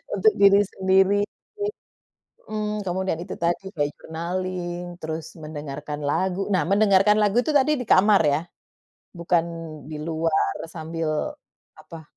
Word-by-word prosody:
Untuk 435 -1 +4
diri 200 0 +7
sendiri. 190 +1 +2 1.3
Mmm, 210 -1 -2
kamu 180 +1 -1
dan 160 - 0
itu 185 - -7
tadi, 170 +3 0
mulai 145 -2 +1
journaling, 175 +1 -4 0.2
terus 160 0 -4 0.2
mendengarkan 150 -1 -6
lagu. 185 +6 0
Nah, 175 -5 +3
mendengarkan 200 0 +4
lagu 205 +2 +2
itu 310 - 0
tadi 280 +2 +4
di - - -5
kamar 205 0 +5
ya? 145 +2 +2 0.8
bukan 170 0 +2 0.5
diluar 160 +1 -1 0.2
sambil 165 0 -4 0.7
apa? 165 -2 -11
180 Hz, 125 wpm, -24 LUFS, 160-200 Hz, 1.3 s, diri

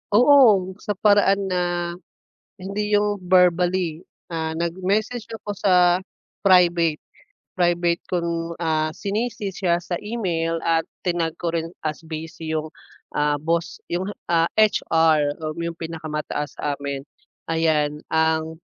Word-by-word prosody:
Oo, 230 -7 +6
sa 205 -2 -3
paraan 200 -1 +3
na 180 -1 +1 0.9
hindi 205 +2 -3
'yung 205 0 +2
verbally. 180 -2 +2 0.2
Ah, 160 -1 -2
nag-message 190 +7 -1
ako 205 -3 -6
sa 180 -2 +4 0.5
private, 175 -4 +4 0.6
private 175 0 +2
kong, 170 -1 -2
ah, 155 -1 0
C-ni-C 210 +1 -3
siya 175 -2 0
sa 175 0 -3
email 170 -7 -2
at 165 -1 +1 0.2
tinag 170 -3 -1
ko 170 - 0
rin 165 -1 -2 0.2
as 155 -1 -2
busy 160 0 -5
'yung, 155 0 -2 0.5
ah, 150 0 +2
boss 165 +1 -1
'yung, 180 +2 -1 0.2
ah, 165 -1 +4
HR, 160 -8 +3
um, 155 +1 -4
'yung 170 0 -3
pinakamataas 155 -3 -5
sa 145 -1 -3
amin. 140 -1 -4 0.5
Ayan, 155 -2 +1 0.2
ang, 160 0 +1
170 Hz, 120 wpm, -23 LUFS, 160-190 Hz, 0.9 s, Oo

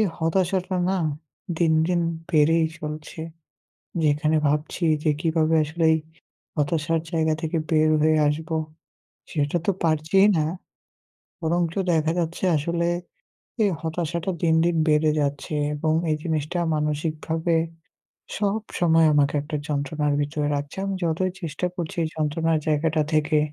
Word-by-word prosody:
এ - - +5 0.2
হতাশাটা 185 +3 0
না, 190 - +1 0.6
দিন, 165 -2 +3
দিন 175 0 +1 0.3
বেড়েই 160 +1 +4
চলছে। 150 +1 -6 0.8
যেখানে 150 +1 +2
ভাবছি 150 +4 -1 0.2
যে 155 - +3
কিভাবে 160 -1 +2
আসলে 160 +2 -3
এই - - +2 0.6
হতাশার 160 +2 0
জায়গা 160 -1 +1
থেকে 165 0 -1
বের 155 -1 +4
হয়ে 155 0 +4
আসব, 155 +3 -2 0.8
সেটা 145 +2 0
তো - - +3
পারছিই 160 +5 +3
না। 155 - +2 1.0
বরঞ্চ 170 0 0 0.2
দেখা 160 -1 +2
যাচ্ছে 170 +2 -2
আসলে, 170 +3 0 0.7
এই 205 - +3
হতাশাটা 170 +2 -2
দিন, 160 -2 +3
দিন 170 -1 +1
বেড়ে 155 0 +4
যাচ্ছে 145 +1 -2 0.2
এবং 155 +1 0 0.2
এই 155 - +2
জিনিসটা 160 0 -2 0.2
মানসিকভাবে 155 +2 -1 0.8
সবসময় 195 -6 +2
আমাকে 145 0 +3
একটা 150 +1 -4
যন্ত্রণার 145 +1 -1
ভিতরে 145 0 -1
রাখছে 145 0 -5
আমি 195 0 -2
যতই 170 +3 0
চেষ্টা 170 +2 -2
করছি 175 +1 -5
এই - - -1
যন্ত্রণার 160 +1 +1
জায়গাটা 155 +1 +2
থেকে 155 0 +3
160 Hz, 130 wpm, -24 LUFS, 150-170 Hz, 1.0 s, এ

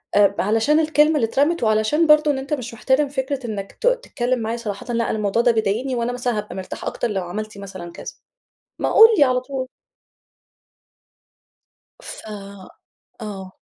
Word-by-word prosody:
آآ، 200 -1 +4
علشان 225 +9 +2
الكلمة 310 0 +3
اللي 265 -6 +2
اترمت 290 +7 +1
وعلشان 220 +9 +2
برضو 300 0 +5
إن 270 - -2
أنتَ 270 +2 -4
مش 245 -5 -4
مِحترم 265 +5 +1
فكرة 265 -1 -3
إنك 200 -3 -5
ت - - -3
تتكلم 255 - 0
معايا 225 +1 -3
صراحةً، 225 0 -6
لأ، 230 0 0
أنا - - +1
الموضوع 210 +2 +1
ده 240 0 +4
بيضايقني 225 +4 -1
وأنا 235 0 -1
مثلًا 245 -2 -2
هابقى 210 -2 -5
مرتاح 190 -1 -7
أكتر - - -2
لو 195 -4 -2
عملتِ 215 +4 -6
مثلًا 190 -3 -8
كذا، - - -9 0.7
ما - - 0
قُل 445 - +10
لي 290 - +7
على 255 -2 +2
طول. 260 0 -5 2.3
ف - - -10 1.1
آه. 195 -3 -8
240 Hz, 165 wpm, -21 LUFS, 210-280 Hz, 2.3 s, قُل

